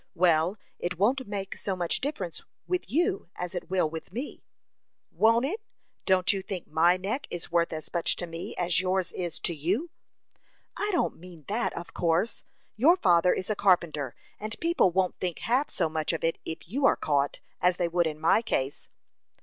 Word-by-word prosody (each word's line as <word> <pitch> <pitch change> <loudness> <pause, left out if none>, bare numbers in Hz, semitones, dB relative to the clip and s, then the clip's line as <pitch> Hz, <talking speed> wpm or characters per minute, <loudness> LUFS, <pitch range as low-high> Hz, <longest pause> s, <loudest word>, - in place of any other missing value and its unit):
"Well, 170 +2 +3 0.2
it 175 0 -2
won't 250 +7 +2
make 200 -2 -4
so 195 - -2
much 175 -2 -1
difference 200 - -3 0.2
with 365 -1 -2
you 285 - +1
as 180 0 -4
it 180 - -5
will 185 -3 +2
with 160 +2 -7
me." 250 +9 -5 0.7
"Won't 230 +3 +4
it! 410 +10 -3 0.5
Don't 185 0 +4
you 195 - -2
think 190 -3 -5
my 170 +3 +4
neck 210 +9 -3
is 175 -1 -6
worth 170 0 +2
as 155 -1 -6
much 170 -2 +2
to 175 - -4
me 165 0 -6
as 175 -1 +2
yours 185 -1 0
is 175 -3 -4
to 170 - 0
you?" 190 - -1 0.8
"I 415 - -1
don't 350 - 0
mean 170 -4 -12
that, 220 +4 0
of 170 - -7
course. 175 +6 +1 0.3
Your 315 +11 +5
father 175 - +4
is 190 +3 -1
a - - +1
carpenter, 170 -9 +2 0.2
and 215 +2 -5
people 335 - +3
won't 185 +1 0
think 180 -3 -2
half 260 +5 +1
so 170 - 0
much 155 +1 -1
of 165 - -3
it 165 0 +1
if 160 - -6
you 270 - +2
are - - +4
caught, 145 -1 0 0.2
as 180 0 +3
they 175 - +1
would 170 0 +2
in 155 -1 -4
my 165 +7 +4
case." 140 - -2
180 Hz, 190 wpm, -28 LUFS, 165-215 Hz, 0.8 s, Your